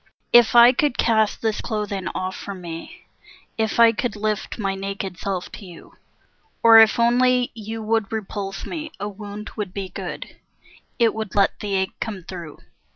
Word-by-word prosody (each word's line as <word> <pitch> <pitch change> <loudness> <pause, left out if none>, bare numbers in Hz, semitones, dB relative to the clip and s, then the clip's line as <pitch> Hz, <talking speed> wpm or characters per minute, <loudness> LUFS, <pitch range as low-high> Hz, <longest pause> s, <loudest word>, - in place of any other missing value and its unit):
If 240 -1 +6
I 240 +1 +9
could 270 0 0
cast 220 -2 +1
this 220 -1 0
clothing 205 -4 -3
off 185 0 -3
from 200 -2 -7
me, 165 -2 -9 0.5
If 220 +1 -1
I 230 -1 +8
could 230 0 -3
lift 215 0 -3
my 195 -4 -1
naked 195 -2 -5
self 190 -3 -4
to 205 - -10
you, 175 -2 -14 0.7
Or 225 -1 +9
if 225 +1 +5
only 250 +1 +3
you 220 0 -6
would 220 -1 0
repulse 200 -2 -5
me, 315 -2 -6
a 205 - -3
wound 210 +1 -8
would 200 -4 -5
be 195 -2 -4
Good; - - -7 0.6
it 230 -2 +3
would 220 -3 -5
let 200 -1 +2
the 205 -2 -2
ache 190 0 -2
come 205 -5 -5
through. 170 -4 -9
210 Hz, 170 wpm, -22 LUFS, 195-225 Hz, 0.7 s, I